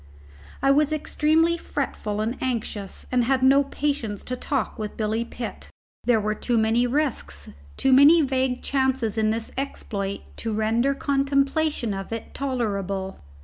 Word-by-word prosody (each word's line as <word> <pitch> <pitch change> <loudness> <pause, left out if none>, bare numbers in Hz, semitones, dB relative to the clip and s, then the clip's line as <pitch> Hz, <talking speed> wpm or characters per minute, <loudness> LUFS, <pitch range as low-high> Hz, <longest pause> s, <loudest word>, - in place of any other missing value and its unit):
I 275 - +5
was 295 +1 +3
extremely 315 +2 +2
fretful 210 -8 -3
and 225 +4 -1
anxious 225 -6 -3
and 250 -2 +2
had 260 +1 +1
no 275 +2 +6
patience 275 -8 -2
to 255 - -4
talk 260 -1 -2
with 215 -1 -5
Billy 220 +1 0
Pitt. 235 0 -7 0.4
There 240 -2 +4
were 215 0 0
too 235 +2 -1
many 225 +2 +3
risks, 245 - -2 0.3
too 265 - +3
many 300 +5 +7
vague 260 -2 0
chances 265 -5 0
in 220 -1 +2
this 225 +1 -1
exploit 200 -7 -4 0.2
to 225 -1 -3
render 225 +6 +1
contemplation 275 -2 +1
of 195 +1 -6
it 225 0 -6
tolerable. 200 -8 -2
245 Hz, 145 wpm, -24 LUFS, 215-275 Hz, 0.4 s, many